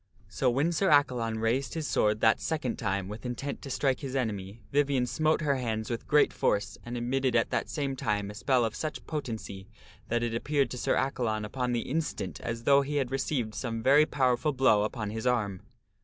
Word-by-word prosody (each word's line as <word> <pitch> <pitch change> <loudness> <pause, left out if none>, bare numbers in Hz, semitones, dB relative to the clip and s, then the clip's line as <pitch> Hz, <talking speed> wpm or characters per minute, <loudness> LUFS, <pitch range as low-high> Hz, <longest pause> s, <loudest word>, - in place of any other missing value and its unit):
So 125 +4 +1
when 140 +7 +1
Sir 190 +3 +1
Accalon 125 -6 +3
raised 120 +7 0
his 160 -2 -2
sword 105 0 +1
that 110 - +4
second 145 -7 -2
time 95 0 -1
with 105 +3 -8
intent 130 +3 -4
to 140 - -8
strike 135 -1 +1
his 135 -1 -5
enemy, 105 -4 -3
Vivien 140 -3 +2
smote 155 +6 +1
her 140 -3 +1
hands 110 -3 -2
with 115 - -4
great 150 -1 +4
force, 100 -2 0
and 120 +1 -5
emitted 125 +1 0
at 115 - +2
the - - +1
same 140 -3 -2
time 105 -5 -1
a - - -10
spell 125 +2 +2
of 110 - -2
Vivien - - -4
ets - - -5
a - - -18
sucn - - -25
potency 110 - -5 0.4
that 120 0 0
it 120 -1 -1
appeared 140 +4 0
to 125 - -4
Sir - - +1
Accalon 115 -5 -1
upon 125 +3 -2
the 120 -1 0
instant 125 - -3
spell - - -12
upon 115 - -1
Sir - - -10
as - - -18
though 140 +2 +5
he 145 +2 -3
had 135 -3 0
received 130 -4 -1
some 115 -2 -4
very 145 +4 +6
powerful 130 +2 +1
blow 130 -6 +4
upon 105 -2 -4
his 110 +1 -5
Accalon. 125 - +5
arm. 100 -4 -4
125 Hz, 230 wpm, -29 LUFS, 110-140 Hz, 0.4 s, very